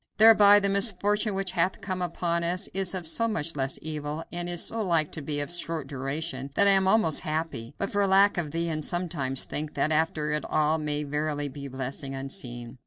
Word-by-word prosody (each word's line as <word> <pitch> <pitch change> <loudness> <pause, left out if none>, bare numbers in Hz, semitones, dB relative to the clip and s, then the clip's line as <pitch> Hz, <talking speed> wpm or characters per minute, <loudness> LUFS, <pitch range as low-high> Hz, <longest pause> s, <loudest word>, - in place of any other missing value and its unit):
Thereby 210 -2 +7
the 200 - 0
misfortune 205 +1 +2
which 195 -2 -1
hath 185 0 0
come 185 -3 -4
upon 170 -1 -1
us 180 +3 -1
is 190 -1 -1
of 180 -2 -4
so 230 +8 +2
much 170 -8 -3
less 135 -1 -2
evil, 150 0 -4
and 175 0 -3
is 175 -1 +2
so 225 -1 0
like 165 -5 +1
to 160 - -5
be 145 0 -3
of 145 +3 -1
such 175 - -1
short 165 -4 -4
duration, 135 0 -4
that 200 - +5
I 200 - +7
am 190 -1 +4
almost 190 -7 +4
happy 155 -5 -4
but 195 - -3
for 205 -1 +1
lack 195 +1 +4
of 160 -3 -3
thee 165 +2 -2
and 155 -2 -3
sometimes 150 -7 -1
think 150 0 -5
that 155 - 0
after 150 -1 0
all 155 +1 +2
it 155 - -6
may 150 0 -1
verily 145 0 -2
be 140 +1 -8
a - - -10
blessing 135 +1 -4
unseen. 125 -2 -6
160 Hz, 220 wpm, -26 LUFS, 145-190 Hz, -, Thereby